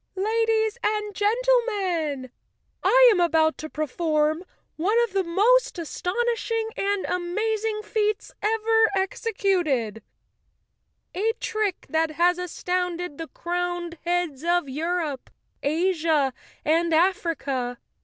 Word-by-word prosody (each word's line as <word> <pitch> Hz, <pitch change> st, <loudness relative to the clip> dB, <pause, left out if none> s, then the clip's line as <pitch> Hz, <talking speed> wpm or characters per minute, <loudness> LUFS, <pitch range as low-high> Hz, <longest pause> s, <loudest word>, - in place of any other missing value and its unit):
"Ladies 445 Hz, +2 st, +1 dB
and 420 Hz, -1 st, -1 dB
gen¬ 410 Hz, +2 st, +2 dB
tlemen, 370 Hz, -, +1 dB, 0.5 s
I -, -, +6 dB
am 400 Hz, -, +2 dB
about 320 Hz, -2 st, +3 dB
to 310 Hz, -, -6 dB
perform 310 Hz, +1 st, 0 dB, 0.3 s
one 405 Hz, +8 st, +2 dB
of 460 Hz, -5 st, -3 dB
the 390 Hz, -1 st, +2 dB
most 425 Hz, +9 st, +3 dB
aston¬ 355 Hz, +2 st, -4 dB, 0.2 s
ishing 455 Hz, -1 st, -2 dB
and 400 Hz, -1 st, -1 dB
amazing 425 Hz, +4 st, -1 dB
feats 425 Hz, -1 st, -1 dB
ever 445 Hz, +1 st, +3 dB
executed—a 380 Hz, -, -3 dB
trick 430 Hz, -4 st, -2 dB
that 320 Hz, 0 st, +1 dB
has 350 Hz, +3 st, +3 dB
astounded 360 Hz, -2 st, -3 dB
the 325 Hz, -, -5 dB
crowned 350 Hz, -1 st, -3 dB
heads 345 Hz, -5 st, -1 dB
of 345 Hz, -2 st, +1 dB
Europe, 310 Hz, 0 st, -2 dB, 0.3 s
Asia 315 Hz, -3 st, +1 dB, 0.3 s
and 330 Hz, +1 st, +2 dB
Africa. 295 Hz, -8 st, 0 dB
355 Hz, 105 wpm, -25 LUFS, 320-425 Hz, 0.5 s, I